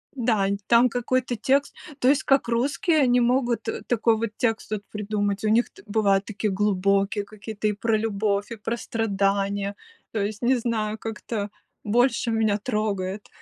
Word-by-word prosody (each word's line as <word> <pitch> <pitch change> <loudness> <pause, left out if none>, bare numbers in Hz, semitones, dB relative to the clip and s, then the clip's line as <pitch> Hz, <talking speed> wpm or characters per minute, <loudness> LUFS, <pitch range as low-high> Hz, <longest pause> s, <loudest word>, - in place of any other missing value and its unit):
Дань, 215 -6 +1
там 235 +1 +5
какой-то 245 +1 -1
текст, 270 +5 +1 0.3
то 250 - +2
есть 275 +1 +4
как? 275 -2 +3
Русские, 275 +7 +1
они 250 -3 +4
могут 240 -2 +1 0.2
такой 230 -1 +2
вот 230 0 -1
текст 225 -2 -1
вот 215 -2 -2
придумать. 205 -1 -2
У 215 - +2
них 230 +3 +3
т - - -16
бывают 200 -2 +2
такие 215 0 -2
глубокие 200 +1 +1
какие-то 215 +1 -5
и 210 - +1
про 220 +1 0
любовь, 210 -1 -1
и 230 - -5
про 230 +3 -3
страдания. 200 -2 -1 0.4
То 220 - -2
есть 205 +1 -3
не 250 +2 +3
знаю, 220 -3 -1
как-то 220 -1 -4 0.3
больше 235 +2 +2
меня 220 -2 +2
трогает. 205 -3 -2
220 Hz, 160 wpm, -25 LUFS, 205-235 Hz, 0.4 s, там